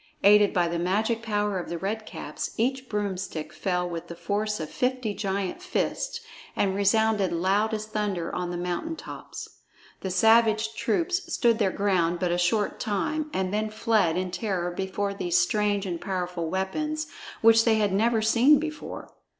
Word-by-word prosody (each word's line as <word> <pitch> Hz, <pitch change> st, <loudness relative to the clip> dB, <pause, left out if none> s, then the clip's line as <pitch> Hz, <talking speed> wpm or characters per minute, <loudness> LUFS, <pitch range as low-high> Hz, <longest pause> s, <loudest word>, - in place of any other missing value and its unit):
Aided 205 Hz, 0 st, +6 dB
by 175 Hz, -2 st, +2 dB
the 170 Hz, 0 st, -2 dB
magic 215 Hz, +6 st, 0 dB
power 210 Hz, -3 st, -1 dB
of 175 Hz, -, -6 dB
the 170 Hz, -, -3 dB
Red 215 Hz, +5 st, -3 dB
Caps, -, -, -6 dB
each 260 Hz, +3 st, -1 dB
broomstick 195 Hz, -6 st, -3 dB
fell 180 Hz, -2 st, -1 dB
with 170 Hz, -1 st, -6 dB
the 170 Hz, -, -7 dB
force 210 Hz, +4 st, -2 dB
of 155 Hz, -, -5 dB
fifty 250 Hz, -4 st, -1 dB
giant 195 Hz, -, -3 dB
fists 370 Hz, +6 st, -2 dB, 0.3 s
and 195 Hz, -1 st, +1 dB
resounded 205 Hz, -1 st, +2 dB
loud 195 Hz, +6 st, +1 dB
as 215 Hz, -1 st, -2 dB
thunder 205 Hz, -5 st, -2 dB
on 180 Hz, -1 st, -2 dB
the 175 Hz, -, -3 dB
mountain 180 Hz, -, -3 dB
tops. -, -, -8 dB, 0.5 s
The 190 Hz, -, -4 dB
savage 220 Hz, +3 st, +4 dB
troops 340 Hz, -, -1 dB
stood 235 Hz, -6 st, +2 dB
their 200 Hz, -3 st, +3 dB
ground 185 Hz, -4 st, +1 dB
but 175 Hz, 0 st, 0 dB
a 175 Hz, -, +1 dB
short 205 Hz, +4 st, +1 dB
time 295 Hz, +10 st, -1 dB
and 190 Hz, -4 st, -1 dB
then 215 Hz, +1 st, 0 dB
fled 215 Hz, -6 st, +1 dB
in 185 Hz, 0 st, -2 dB
terror 180 Hz, -3 st, -2 dB
before 195 Hz, +2 st, -2 dB
these 175 Hz, -3 st, 0 dB
strange 205 Hz, +2 st, +1 dB
and 175 Hz, -3 st, -4 dB
powerful 180 Hz, -3 st, -3 dB
weapons 305 Hz, -, -2 dB, 0.4 s
which 225 Hz, 0 st, +6 dB
they 225 Hz, -1 st, +4 dB
had 205 Hz, -3 st, +1 dB
never 220 Hz, +2 st, +2 dB
seen 240 Hz, +7 st, +5 dB
before. 305 Hz, +1 st, -6 dB
205 Hz, 170 wpm, -26 LUFS, 185-225 Hz, 0.5 s, Aided